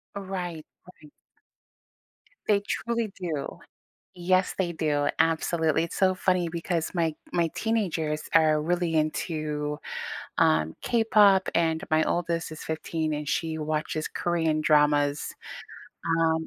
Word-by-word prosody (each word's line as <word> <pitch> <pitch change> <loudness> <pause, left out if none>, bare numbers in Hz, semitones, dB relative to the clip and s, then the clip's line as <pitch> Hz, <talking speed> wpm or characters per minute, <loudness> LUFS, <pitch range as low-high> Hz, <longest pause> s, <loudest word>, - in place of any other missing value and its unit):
Right, 180 -5 -5 0.3
right. 150 - -18 1.4
They 205 -2 +3
truly 230 +1 -2
do, 160 -6 -4 0.6
yes 185 +1 +1
they 175 -2 0
do, 145 -3 0
absolutely, 165 -1 +2
it's 170 - -6
so 185 -1 +3
funny 180 -1 +1
because 165 0 -2
my 165 -3 +1 0.2
my 170 -1 +2
teenagers 170 -9 -1
are 155 -2 +5
really 175 0 0
into, 155 -1 -1 0.6
um, 80 0 +3
K-pop, 210 -5 +4
and 160 -1 +1
my 155 0 +4
oldest 170 -2 -1
is 155 - -8
15, 160 0 -2
and 150 0 -4
she 160 -2 -1
watches 155 0 -2
Korean 160 -3 0
dramas, 145 -1 +2 0.9
um, 160 0 +1
165 Hz, 115 wpm, -27 LUFS, 155-180 Hz, 1.4 s, are